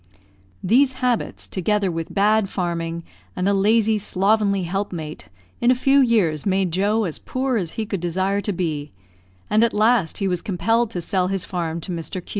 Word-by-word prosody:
These 260 +7 +4
habits 250 -3 -2
together 200 0 0
with 165 -1 -5
bad 210 0 +2
farming, 170 -3 -3 0.3
and 180 +1 -1
a 200 - +3
lazy, 215 +2 +3
slovenly 200 0 +1
helpmate, 175 -4 -4 0.3
in 240 - +2
a 255 - +5
few 270 +2 +3
years 210 - +2
made 190 -2 +1
Joe 205 +5 +1
as 170 -6 -4
poor 260 0 -2
as 180 -7 -2
he 220 - -3
could 200 -2 -3
desire 190 +3 0
to 205 - -2
be; 155 -6 -3 0.6
and 215 +2 +3
at 235 - +1
last 215 -4 +2
he 195 - -1
was 180 -2 -1
compelled 225 +5 0
to 180 -6 -5
sell 185 +1 0
his 190 -1 -2
farm 170 -2 -3
to 185 - -4
Mr. 165 -3 -6
Q 185 -2 -5
195 Hz, 185 wpm, -22 LUFS, 175-220 Hz, 0.6 s, a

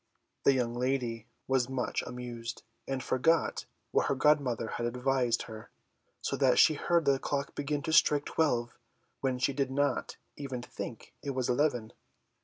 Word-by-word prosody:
The 140 - +7
young 120 -3 0
lady 120 -3 -1 0.2
was 130 -1 +2
much 130 -2 -1
amused, 120 -1 -6 0.2
and 135 -1 -2
forgot 165 +6 +2 0.3
what - - +2
her - - +1
godmother 135 -5 +2
had 120 - -2
advised 125 -1 +1
her, 110 -1 -10 0.5
so - - -1
that 130 -3 +4
she 155 - +7
heard 170 +2 +1
the 140 -1 +3
clock 140 0 -2
begin 145 0 -2
to 160 - -2
strike 145 -3 +5
twelve 120 -7 +1 0.5
when 130 -2 0
she 125 +2 +1
did 135 -1 0
not 145 +2 0 0.2
even 130 -4 -5
think 120 -2 -8
it 140 -2 -4
was 130 -2 0
eleven. 125 -4 +1
130 Hz, 160 wpm, -31 LUFS, 120-140 Hz, 0.5 s, The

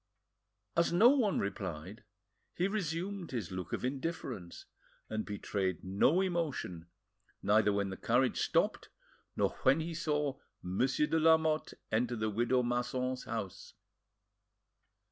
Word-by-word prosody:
As 170 0 +3
no 205 +8 +7
one 255 -8 +3
replied, 95 0 -4 0.5
he 180 - +1
resumed 185 -1 -3
his 115 -9 -4
look 90 -2 -5
of - - -2
indifference, 130 - -4 0.5
and 110 0 -2
betrayed 100 -3 -2
no 100 - +3
emotion, 155 - -2 0.6
neither 105 0 +4
when 100 -1 0
the 95 - -6
carriage 125 +2 +2
stopped - - +1 0.5
nor - - +2
when 135 +4 +4
he 165 +1 -3
saw 150 -4 -1 0.2
Monsieur 125 +11 +1
de 160 +2 +1
Lamotte 160 -1 +3 0.2
enter 120 +2 +1
the 110 -1 -1
widow 120 +4 +2
Masson's 125 +1 -1
house. 110 -6 -5
125 Hz, 125 wpm, -33 LUFS, 100-160 Hz, 0.6 s, no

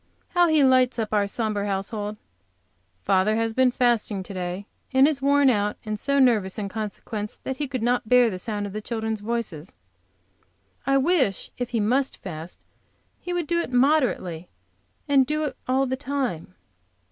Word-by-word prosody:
How 350 -1 +4
he 310 -3 +4
lights 255 -1 +4
up 220 -2 -2
our 205 -1 +2
sombre 210 -2 -2
household! 205 +2 -3 0.9
Father 195 - +2
has 225 0 0
been 260 +1 +4
fasting 235 -5 +1
to 195 - -9
day, 180 +1 -4 0.3
and 265 +1 +5
is 300 -3 0
so 275 - -5
worn 285 0 +5
out 205 -2 0
and 215 -1 -3
so 280 +4 0
nervous 225 -8 +3
in 205 -2 -3
consequence, 210 0 -5
that 265 - -4
he 295 - -2
could 255 -4 -4
not 245 -2 0
bear 250 -2 +5
the 185 - -5
sound 205 -1 -3
of 200 - -7
the 215 - -4
children's 220 -1 -3
voices. 205 -7 -4 1.1
I 275 0 +4
wish, 270 - +1
if 245 -1 -2
he 235 -2 -1
must 255 +6 +1
fast, 165 -2 -8 0.5
he 355 - -6
would 350 -2 -1
do 340 +3 0
it 340 - -3
moderately, 245 - +1 0.6
and 280 -2 +5
do 305 +3 -1
it 280 -4 -3
all 265 +1 +2
the 260 0 -1
time. 260 - -3
230 Hz, 180 wpm, -24 LUFS, 205-270 Hz, 1.1 s, and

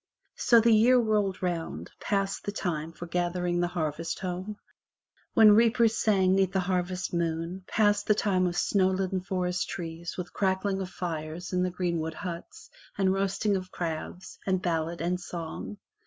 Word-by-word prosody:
So 235 - +5
the 230 0 +5
year 235 +4 +6
rolled 210 -5 +1
round; 170 -2 -3
passed 195 -1 -1
the 205 - -1
time 165 -6 -3
for 170 +1 -8
gathering 175 0 -1
the 175 - +2
harvest 165 -2 -3
home, 185 +2 -4 0.8
when 220 -1 +8
reapers 230 0 +4
sang 190 -4 +3
'neath 190 -1 +2
the 190 - +2
harvest 180 0 -2
moon, 170 +2 -2
passed 205 -1 +2
the 210 - +5
time 185 -3 +2
of 175 0 -3
snow 190 0 +3
laden 190 0 -1
forest 180 -1 -2
trees 170 -1 -6
with 180 -1 -6
crackling 190 0 0
of 185 - -4
fires 165 -1 -5
in 180 - +2
the 180 - +1
greenwood 170 -3 -2
huts, 205 - -7 0.3
and 190 -1 +3
roasting 195 +1 0
of 185 -1 -4
crabs, 170 +1 -5
and 190 -1 +2
ballad 165 -1 -1
and 180 +2 0
song. 170 +4 -6
185 Hz, 165 wpm, -28 LUFS, 175-195 Hz, 0.8 s, when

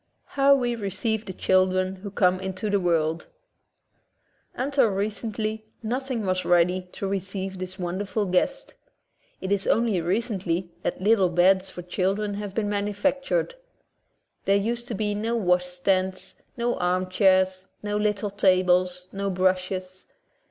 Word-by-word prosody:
How 280 0 +5
We 245 -3 0
Receive 220 +1 -2
the 190 - -5
Children 185 0 +3
Who 200 +2 -7
Come 185 -2 +2
Into 190 +2 -3
the 200 - +3
World 165 -2 0 1.3
Until 275 -1 +2
recently 215 +2 -3 0.2
nothing 250 -1 -2
was 185 -1 0
ready 180 +1 +2
to 195 - -4
receive 195 0 -4
this 185 0 -6
wonderful 190 +3 -2
guest. 195 - 0 0.7
It 190 - -4
is 200 -1 +1
only 225 -6 +2
recently 185 -2 -1
that 180 - -3
little 200 -3 +4
beds 185 +2 +3
for 180 - -8
children 195 +3 -1
have 200 -1 -5
been 220 -2 0
manufac 205 +6 0
tured. - - 0 0.9
There 200 +1 +4
used 235 +4 -2
to 235 - -3
be 210 +1 -1
no 225 +3 -1
washstands, 185 -1 0 0.2
no 240 0 0
armchairs, 185 +1 +2 0.2
no 205 0 -2
little 210 -1 0
tables, 185 -2 +2
no 200 0 -2
brushes. 185 0 -1
195 Hz, 135 wpm, -25 LUFS, 185-215 Hz, 1.3 s, How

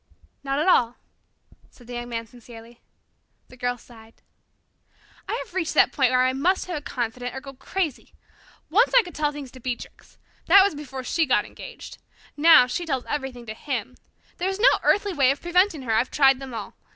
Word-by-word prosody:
"Not 275 0 -2
at 305 - 0
all," 245 -9 +3 0.7
said 245 - -19
the 245 - -9
Young 240 0 -5
Man 230 -1 -4
sincerely. 235 0 -15 0.7
The - - -14
Girl 245 -1 -2
sighed. 225 -2 -18 1.1
"I - - -1
have 445 - -5
reached 360 -4 -2
that - - +5
point 265 -3 +2
where 255 0 +3
I 255 - +1
must 345 +8 +1
have 360 - -5
a 295 - -4
confidant, 245 -1 -4
or - - -4
go 275 0 -11
crazy. 315 +2 -4 0.6
Once 450 +9 +3
I - - +7
could 355 - -11
tell 295 -1 0
things 285 -3 -9
to 260 - -13
Beatrix. 250 -1 -7 0.3
That 390 +3 +8
was 400 - +1
before 270 -3 -7
she 320 +4 0
got 210 -5 +2
engaged. - - -11 0.4
Now 315 -3 +7
she 255 +8 -3
tells 265 -5 -2
everything 265 -4 -5
to 215 - -6
him. 250 0 -5 0.4
There 370 +1 -1
is 385 - -3
no 475 - +5
earthly 405 -1 +2
way 275 -5 +3
of 275 - 0
preventing 350 -3 +1
her. 230 -3 -1
I've 230 +4 +1
tried 270 -2 +4
them 270 -1 -8
all. 210 -3 -7
265 Hz, 200 wpm, -24 LUFS, 245-325 Hz, 1.1 s, That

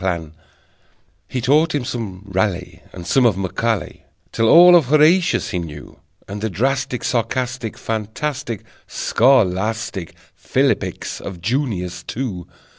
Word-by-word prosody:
He 125 - -3
taught 150 +6 +3
him 135 -4 -2
some 110 -8 -5
Raleigh, 95 -2 -2
And 90 -2 -9
some 130 +9 +3
of 115 -6 +3
Macaulay, 100 +2 -2 0.3
Till 115 -1 +1
all 175 +1 +9
of 165 -5 +5
"Horatius" 155 +6 +3
he 90 - -1
knew, 75 -3 -9 0.3
And 100 +1 -6
the 110 - -1
drastic, 130 +5 -1
sarcastic, 125 -1 -2
Fantastic, 115 +3 -4 0.2
scholastic 110 - +1 0.2
Philippics - - -1
of 95 -3 -7
"Junius," 105 -4 -2
too. 105 -9 -5
115 Hz, 115 wpm, -20 LUFS, 95-135 Hz, 0.3 s, all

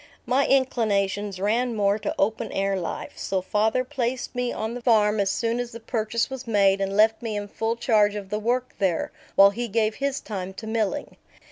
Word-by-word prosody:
My 260 +3 +2
inclinations 205 -7 +1
ran 230 +4 +1
more 205 0 +2
to - - -3
open 220 +2 0
air 195 0 0
life, 175 -3 -4
so 190 - -1
father 215 +6 +1
placed 255 -2 -3
me 245 -1 -1
on 220 +1 -3
the 245 - -6
farm 215 -3 +3
as 200 -1 +2
soon 230 +3 0
as 245 -1 -4
the 230 - -7
purchase 225 0 -1
was 265 -2 -7
made 200 -3 +3
and 195 +1 -1
left 220 +1 +4
me 225 -3 -3
in 205 0 -4
full 225 +3 -2
charge 215 -3 +3
of 200 -2 -6
the 210 - -1
work 245 +3 -1
there, 185 -5 0 0.2
while 200 0 +8
he 240 +4 -3
gave 215 0 +1
his 275 -1 -1
time 190 -3 -6
to 220 - -8
milling. 220 +5 -2
220 Hz, 205 wpm, -25 LUFS, 200-240 Hz, 0.2 s, while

